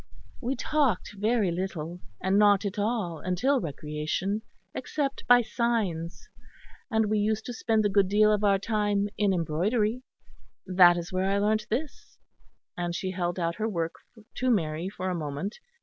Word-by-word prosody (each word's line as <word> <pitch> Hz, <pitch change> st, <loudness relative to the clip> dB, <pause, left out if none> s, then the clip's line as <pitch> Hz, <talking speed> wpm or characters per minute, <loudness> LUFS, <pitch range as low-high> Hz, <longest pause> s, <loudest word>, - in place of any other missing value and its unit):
We 260 Hz, +2 st, -1 dB
talked 275 Hz, -14 st, 0 dB
very 210 Hz, -2 st, +1 dB
little; 175 Hz, -1 st, -4 dB, 0.2 s
not 200 Hz, +1 st, +4 dB
at 200 Hz, +1 st, -3 dB
all 205 Hz, -7 st, -1 dB
until 250 Hz, +10 st, +1 dB
recreation; 155 Hz, +6 st, -3 dB, 0.3 s
except 280 Hz, -3 st, -3 dB
by 245 Hz, 0 st, +7 dB
signs, 215 Hz, -9 st, -2 dB, 0.6 s
and 220 Hz, -2 st, +2 dB
we 215 Hz, 0 st, +1 dB
used 215 Hz, +1 st, 0 dB
to 245 Hz, -, -5 dB
spend 220 Hz, -2 st, +1 dB
a -, -, +3 dB
good 200 Hz, -1 st, +3 dB
deal 210 Hz, +2 st, +4 dB
of 210 Hz, 0 st, 0 dB
our 200 Hz, -1 st, +4 dB
time 205 Hz, -1 st, 0 dB
in 205 Hz, -2 st, +3 dB
embroidery. 205 Hz, +8 st, 0 dB, 0.6 s
That 180 Hz, -2 st, +6 dB
is 175 Hz, +1 st, -5 dB
where 185 Hz, +1 st, +1 dB
I 200 Hz, -, +2 dB
learnt 215 Hz, +1 st, +1 dB
this," 275 Hz, +6 st, -4 dB, 0.6 s
and 175 Hz, -1 st, -3 dB
she 185 Hz, +1 st, -2 dB
held 175 Hz, -1 st, -2 dB
out 170 Hz, -1 st, -1 dB
her 220 Hz, +1 st, -1 dB
work 165 Hz, -5 st, -2 dB, 0.4 s
to 255 Hz, -, +1 dB
Mary 165 Hz, -5 st, 0 dB
for 185 Hz, -1 st, -5 dB
a 185 Hz, -, 0 dB
moment. 160 Hz, +5 st, -4 dB
200 Hz, 160 wpm, -27 LUFS, 175-220 Hz, 0.6 s, by